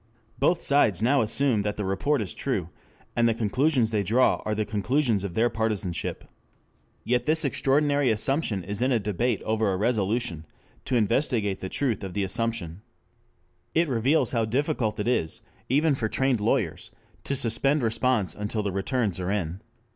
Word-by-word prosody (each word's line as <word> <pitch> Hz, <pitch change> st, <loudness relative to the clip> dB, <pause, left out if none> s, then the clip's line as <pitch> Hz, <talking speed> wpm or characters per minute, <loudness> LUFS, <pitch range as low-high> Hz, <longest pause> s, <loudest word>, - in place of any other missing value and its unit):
Both 170 Hz, +5 st, +2 dB
sides 110 Hz, -9 st, +3 dB
now 135 Hz, +4 st, +4 dB
assume 115 Hz, 0 st, +1 dB
that 105 Hz, 0 st, -3 dB
the 105 Hz, -, -2 dB
report 105 Hz, +8 st, 0 dB
is 95 Hz, -, -6 dB
true, 100 Hz, -12 st, -2 dB, 0.5 s
and 120 Hz, -1 st, +3 dB
the 115 Hz, -, 0 dB
conclusions 120 Hz, +2 st, +1 dB
they 105 Hz, -2 st, +1 dB
draw 115 Hz, +6 st, +2 dB
are 105 Hz, -, -1 dB
the 105 Hz, 0 st, -1 dB
conclusions 110 Hz, 0 st, 0 dB
of 95 Hz, -4 st, -5 dB
their 115 Hz, +2 st, +3 dB
partisanship. 105 Hz, -6 st, -2 dB, 0.8 s
Yet 125 Hz, 0 st, 0 dB
this 160 Hz, +1 st, +2 dB
extraordinary 140 Hz, 0 st, +2 dB
assumption 110 Hz, -, 0 dB
is 100 Hz, +4 st, -4 dB
in 130 Hz, +2 st, +2 dB
a 120 Hz, -, +4 dB
debate 105 Hz, +2 st, -1 dB
over 110 Hz, -2 st, +1 dB
a 95 Hz, -, -1 dB
resolution 105 Hz, -5 st, -1 dB, 0.4 s
to 130 Hz, -, -1 dB
investigate 115 Hz, -3 st, +1 dB
the 95 Hz, -, -5 dB
truth 125 Hz, -4 st, -1 dB
of 95 Hz, -1 st, -6 dB
the 100 Hz, -, 0 dB
assumption. 100 Hz, -3 st, -2 dB, 0.9 s
It 165 Hz, +1 st, +3 dB
reveals 130 Hz, +2 st, +2 dB
how 115 Hz, -3 st, +1 dB
difficult 125 Hz, -2 st, -1 dB
it 105 Hz, -, -2 dB
is, 80 Hz, -10 st, 0 dB, 0.3 s
even 150 Hz, +4 st, +3 dB
for 115 Hz, -5 st, -2 dB
trained 130 Hz, -3 st, +1 dB
lawyers, 105 Hz, -, 0 dB, 0.4 s
to 140 Hz, -, -1 dB
suspend 130 Hz, +4 st, +1 dB
response 115 Hz, -5 st, +1 dB
until 105 Hz, +1 st, -3 dB
the 100 Hz, -, -1 dB
returns 100 Hz, 0 st, -1 dB
are 90 Hz, 0 st, -2 dB
in. 95 Hz, -2 st, -2 dB
115 Hz, 170 wpm, -26 LUFS, 100-130 Hz, 0.9 s, now